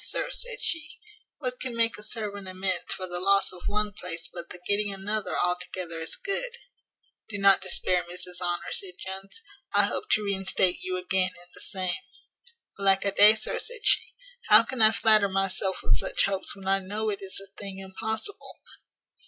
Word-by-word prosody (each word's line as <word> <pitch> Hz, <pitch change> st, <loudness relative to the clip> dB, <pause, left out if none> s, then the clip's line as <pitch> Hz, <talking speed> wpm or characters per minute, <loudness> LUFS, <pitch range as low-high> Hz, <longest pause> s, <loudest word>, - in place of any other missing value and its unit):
sir," -, -, -2 dB
said -, -, -2 dB
she, 330 Hz, +3 st, -4 dB, 0.4 s
"what 250 Hz, -3 st, -5 dB
can 255 Hz, -2 st, -3 dB
make 230 Hz, 0 st, +2 dB
a -, -, -10 dB
servant 210 Hz, -3 st, -4 dB
amends 185 Hz, -1 st, -3 dB
for 185 Hz, -, -3 dB
the 175 Hz, -1 st, -3 dB
loss 195 Hz, +1 st, +4 dB
of 180 Hz, -, -11 dB
one 210 Hz, 0 st, -1 dB
place 170 Hz, -4 st, +4 dB
but 170 Hz, -1 st, -7 dB
the 180 Hz, -, -7 dB
getting 205 Hz, 0 st, +1 dB
another 200 Hz, +2 st, -3 dB
altogether 180 Hz, -1 st, -1 dB
as 160 Hz, -, -1 dB
good?" 475 Hz, +5 st, -1 dB, 0.7 s
"Do 205 Hz, -, -4 dB
not 195 Hz, -1 st, +5 dB
despair, 185 Hz, -1 st, +3 dB
Mrs 180 Hz, +1 st, -4 dB
Honour," 175 Hz, -1 st, -2 dB
said 185 Hz, -2 st, -1 dB
Jones, 190 Hz, -, -7 dB, 0.3 s
"I -, -, +8 dB
hope 425 Hz, -, -3 dB
to 215 Hz, -, +2 dB
reinstate 190 Hz, -2 st, +1 dB
you 185 Hz, 0 st, -3 dB
again 185 Hz, 0 st, -1 dB
in 175 Hz, -, -16 dB
the -, -, -14 dB
same." 185 Hz, 0 st, -3 dB, 0.8 s
"Alack 195 Hz, 0 st, +2 dB
a 200 Hz, -, +1 dB
day, 210 Hz, +2 st, +7 dB
sir," 215 Hz, -, -2 dB
said 480 Hz, -3 st, -5 dB
she, -, -, +2 dB, 0.3 s
"how 215 Hz, +1 st, +8 dB
can 255 Hz, 0 st, -4 dB
I 215 Hz, 0 st, +7 dB
flatter 215 Hz, -1 st, +4 dB
myself 195 Hz, 0 st, -1 dB
with 100 Hz, -, +2 dB
such -, -, +1 dB
hopes 195 Hz, 0 st, -2 dB
when 195 Hz, -1 st, -11 dB
I 195 Hz, 0 st, +2 dB
know 210 Hz, +3 st, -3 dB
it 200 Hz, -, -6 dB
is 195 Hz, -1 st, -3 dB
a 195 Hz, 0 st, -14 dB
thing 195 Hz, -1 st, -7 dB
impossible? 220 Hz, -, -3 dB
195 Hz, 185 wpm, -26 LUFS, 185-215 Hz, 0.8 s, I